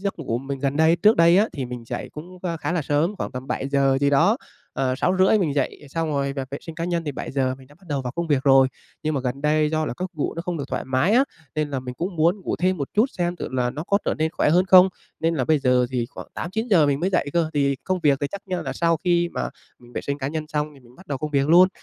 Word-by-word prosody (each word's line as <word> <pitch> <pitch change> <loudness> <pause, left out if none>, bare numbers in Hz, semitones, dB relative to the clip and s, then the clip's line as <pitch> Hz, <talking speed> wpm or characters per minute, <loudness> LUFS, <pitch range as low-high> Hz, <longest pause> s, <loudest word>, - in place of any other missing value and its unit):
giấc 200 -3 -3
ngủ 120 -6 -2
mình 135 +1 -5
gần 140 +1 -1
đây 160 +2 +4
trước 215 +4 +4
đây 170 +2 +6
á, 215 - +4
thì 135 - -4
mình 125 -1 -7
dậy - - -5
cũng, 175 +5 -10
a, 170 -3 -2
khá 165 - -3
là 170 -3 0
sớm, 150 +8 0
khoảng - - -4
tầm 125 +1 -6
7:00 135 -1 +1
gì 140 0 +3
đó, 195 - +4 0.4
à, 130 -1 0
6:30 185 +6 +3
mình 160 -8 0
dậy, 145 +1 -2
xong 165 +3 -2
rồi 140 -2 -1
là 135 - -2
vệ 140 - -4
sinh 165 - -9
cá 165 0 -3
nhân 170 -1 -1
thì 145 - -3
7:00 130 -1 -2
mình 130 - -15
đã 145 - -19
bắt 190 - -22
đầu 140 -3 -1
vào 125 0 -4
công 170 +2 -3
việc 145 -4 +1
rồi. 135 -1 +6 0.3
Nhưng 155 0 -1
mà 140 - 0
gần 130 +2 -3
đây 150 0 +2
do 155 -1 0
là - - -3
gấc 185 0 -4
ngủ 150 - -2
nó 165 - -4
không 175 -1 -3
được 140 - -3
thoải - - -3
mái 130 +10 +1
á, 260 +4 +5 0.3
nên 155 -1 -1
là 135 -2 -2
mình 125 -1 -7
cũng 175 +5 -4
muốn 170 +5 +2
ngủ - - -3
thêm 185 +1 +1
một 140 -4 -3
chút 220 +5 +4
xem 175 0 0
thử - - -5
là 125 -1 0
nó 155 +6 -6
có 200 - +2
trở - - 0
nên 160 0 0
khỏe 175 - +1
hơn 180 +3 +4
không. 185 0 +8 0.3
Nên 165 +1 +1
là 130 - 0
bây 155 +3 +3
giờ 125 -2 +3
thì 120 -2 -1
khoảng - - -9
8:00-9:00 190 -3 +1
mình 140 0 +1
mới 185 +3 0
dậy 145 -6 0
cơ, 170 -2 +1
thì 140 -1 +2
công 185 -1 -1
việc 140 -2 +4
thì 145 - 0
chắc, 200 - -5 0.2
ơ, - - -4
là - - -4
sau 165 -1 +1
khi 175 -1 +2
mà - - -2 0.3
mình 120 0 -17
vệ - - -3
sinh 140 0 -3
cá 135 - -2
nhân 155 +1 -3
xong 150 0 -2
thì 135 - -17
mình 120 0 -20
bắt 185 +1 -16
đầu 140 -2 -3
công 155 -1 -4
việc 140 0 +1
luôn. 180 +3 +7
155 Hz, 300 wpm, -23 LUFS, 135-175 Hz, 0.4 s, không